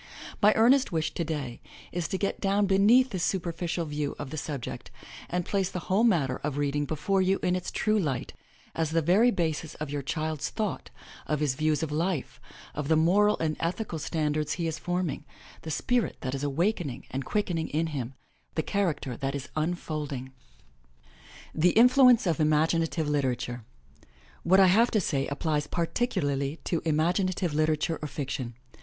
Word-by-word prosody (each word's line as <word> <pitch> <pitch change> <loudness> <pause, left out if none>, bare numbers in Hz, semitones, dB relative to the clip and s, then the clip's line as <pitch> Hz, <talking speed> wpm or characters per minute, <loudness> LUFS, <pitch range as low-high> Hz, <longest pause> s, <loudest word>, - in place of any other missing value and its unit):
My 210 0 +7
earnest 255 +3 +4
wish 160 -1 -1
today 150 -7 -4 0.3
is 175 -2 -2
to 190 - -2
get 200 - -2
down 200 +1 +2
beneath 215 +7 +5
this 185 -3 -2
superficial 170 -2 -1
view 150 -1 -3
of 135 - -6
the - - -4
subject, 145 -4 -5 0.4
and 175 0 -1
place 195 -2 0
the - - -5
whole 200 +4 +4
matter 155 - +2
of 145 -1 -4
reading 145 0 0
before 160 +7 0
you 190 +1 +2
in 180 0 +2
its 185 - -3
true 215 0 +1
light, 140 -9 -2 0.4
as 165 -2 -1
the 165 0 +1
very 195 +10 +5
basis 165 -6 -2
of 150 -2 -5
your 145 -1 -2
child's 155 +1 -2
thought, 215 -4 -3 0.4
of 150 -1 0
his 150 -3 +1
views 155 +1 0
of 155 - -3
life, 165 -1 -2 0.3
of 150 -1 -4
the 160 - +4
moral 200 +7 +4
and 155 -1 -1
ethical 170 0 -2
standards 150 0 -1
he 165 +3 -2
is 160 -1 -2
forming, 175 -4 -2 0.4
the 160 - -7
spirit 245 +9 0
that 130 - -3
is 135 0 -3
awakening 150 - -1
and 135 +1 -3
quickening 175 -2 -1
in 160 +3 0
him, 135 -5 -4 0.4
the 160 - 0
character 165 - -1
that 135 +3 -3
is 140 -1 -6
unfolding. 155 -5 -3 1.2
THE 170 +3 +3
INFLUENCE 250 -1 +6
OF 170 -2 0
IMAGINATIVE 160 +1 +2
LITERATURE 125 -5 -1 0.8
What 190 +3 +4
I 195 - +8
have 220 +6 +5
to 215 - +2
say 140 -7 -1
applies 150 0 -1
particularly 150 - -1
to 170 - -1
imaginative 175 +2 +1
liter 155 +1 +2
ature 160 +2 -2
or 150 - -3
fiction. 135 -4 -4
160 Hz, 170 wpm, -28 LUFS, 145-185 Hz, 1.2 s, I